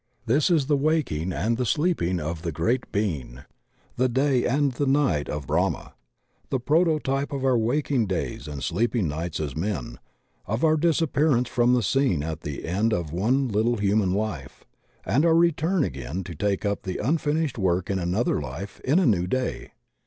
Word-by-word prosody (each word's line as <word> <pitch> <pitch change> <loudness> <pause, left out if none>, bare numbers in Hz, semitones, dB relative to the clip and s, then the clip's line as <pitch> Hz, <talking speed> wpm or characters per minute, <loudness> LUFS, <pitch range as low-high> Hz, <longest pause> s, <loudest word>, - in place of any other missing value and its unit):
This 145 +10 +2
is 160 -6 +3
the 145 +1 +2
waking 140 - 0
and 110 +7 0
the 125 - 0
sleeping 120 - 0
of 80 +1 -4
the 85 -1 -3
Great 115 - -1
Being; 75 - -2 0.6
the 130 +1 +2
Day 130 0 +2
and 140 +2 +2
the 140 +3 -2
Night 135 - +1
of 75 -2 -4
Brahma; - - -1 0.6
the 130 - 0
proto 155 +5 +2
type 135 -1 -2
of 135 -2 -2
our 130 -1 +3
waking 120 +1 +1
days 75 -7 -3
and 70 -2 -6
sleeping 110 +2 0
nights 80 +2 -3
as 75 -4 -3
men, 80 - -3 0.5
of 110 +6 -2
our 155 -1 +5
disappearance 150 -5 +2
from 120 +1 +3
the 120 - +1
scene 130 - +1
at 80 0 -4
the 75 -3 -6
end 105 +6 +1
of 85 -3 -4
one 125 +10 +1
little 115 +2 +1
himian 100 -2 +1
life, 100 -11 -4 0.4
and 140 +6 +2
our 165 -1 +4
return 170 +1 +2
again 70 - -4
to 85 - -8
take 100 +5 -1
up 100 0 -1
the 95 - -4
imfinished 150 0 0
work 90 -2 +1
in 95 - 0
another 90 0 0
life, 75 +9 -7
in 140 +6 +2
a 185 - +4
new 90 -8 +2
day. 130 +4 -2
110 Hz, 180 wpm, -25 LUFS, 85-140 Hz, 0.6 s, our